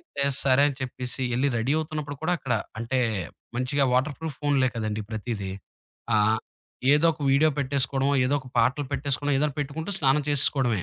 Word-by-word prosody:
అయితే 140 Hz, -, -4 dB, 0.2 s
సరే 135 Hz, +1 st, +4 dB
అని 135 Hz, -, -5 dB
చెప్పేసి 130 Hz, 0 st, -4 dB
ఎళ్లి 135 Hz, +3 st, +2 dB
రెడీ 115 Hz, +5 st, 0 dB
అవుతున్నప్పుడు 150 Hz, -2 st, -4 dB
కూడా 180 Hz, +3 st, +1 dB
అక్కడ 135 Hz, -2 st, -3 dB, 0.3 s
అంటే 120 Hz, +3 st, -1 dB, 0.6 s
మంచిగా 130 Hz, +3 st, +1 dB
వాటర్‌ప్రూఫ్ 145 Hz, +3 st, -1 dB
ఫోనులే 140 Hz, -3 st, +2 dB
కదండీ 110 Hz, -1 st, -2 dB
ప్రతీది. 110 Hz, -3 st, -4 dB, 0.6 s
ఆహ్, 110 Hz, +1 st, +3 dB, 0.5 s
ఏదో 150 Hz, +3 st, +4 dB
ఒక 155 Hz, -, -16 dB
వీడియో 150 Hz, +3 st, +4 dB
పెట్టేసుకోవడమో, 135 Hz, 0 st, +1 dB
ఏదో 140 Hz, +3 st, +1 dB
ఒక 130 Hz, -, -13 dB
పాటలు 140 Hz, +1 st, +2 dB
పెట్టేసుకున్నా 145 Hz, +1 st, 0 dB
ఏదన్నా 150 Hz, -1 st, 0 dB
పెట్టుకుంటూ 160 Hz, +6 st, -4 dB
స్నానం 140 Hz, 0 st, +3 dB
చేసేసుకోవడమే. 130 Hz, -, +2 dB
135 Hz, 155 wpm, -26 LUFS, 125-145 Hz, 0.6 s, సరే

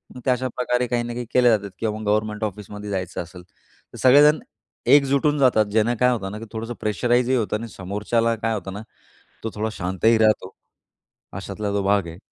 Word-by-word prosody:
मग 125 Hz, -, -9 dB
त्या 130 Hz, -, +4 dB
अशाप्रकारे 125 Hz, 0 st, -1 dB
काही 120 Hz, 0 st, 0 dB
ना 120 Hz, 0 st, -5 dB
काही 120 Hz, 0 st, -5 dB
केल्या 120 Hz, -3 st, +5 dB
जातात 100 Hz, 0 st, -8 dB
किंवा 110 Hz, -2 st, -2 dB
मग 110 Hz, -, -7 dB
गव्हर्नमेंट 105 Hz, +1 st, 0 dB
ऑफिसमध्ये 105 Hz, 0 st, -6 dB
जायचं 95 Hz, -3 st, -3 dB
असेल 90 Hz, +1 st, -13 dB
तर, 90 Hz, -, -20 dB
सगळेजण 145 Hz, +4 st, +6 dB, 0.6 s
एकजुटून 140 Hz, +1 st, +2 dB
जातात 125 Hz, -5 st, +4 dB
ज्यांना 110 Hz, +3 st, +2 dB
काय 125 Hz, 0 st, +4 dB
होतं 95 Hz, -5 st, -3 dB
ना, 105 Hz, -, -7 dB
की 115 Hz, -, -8 dB
थोडंसं 115 Hz, +2 st, -4 dB
प्रेशराइजही 120 Hz, +4 st, +1 dB
होतं 110 Hz, -2 st, -1 dB
आणि 115 Hz, +2 st, -7 dB
समोरच्याला 105 Hz, +5 st, -1 dB
काय 115 Hz, +1 st, -2 dB
होतं 95 Hz, -2 st, -6 dB
ना, 105 Hz, -, -6 dB, 0.6 s
तो 110 Hz, -, -2 dB
थोडा 110 Hz, +1 st, -2 dB
शांतही 95 Hz, +5 st, +1 dB
राहतो 110 Hz, -4 st, +2 dB, 0.8 s
अशातला 100 Hz, +1 st, -4 dB
जो 100 Hz, 0 st, 0 dB
भाग 100 Hz, -1 st, +2 dB
आहे. 85 Hz, +1 st, -9 dB
110 Hz, 190 wpm, -23 LUFS, 100-120 Hz, 0.8 s, सगळेजण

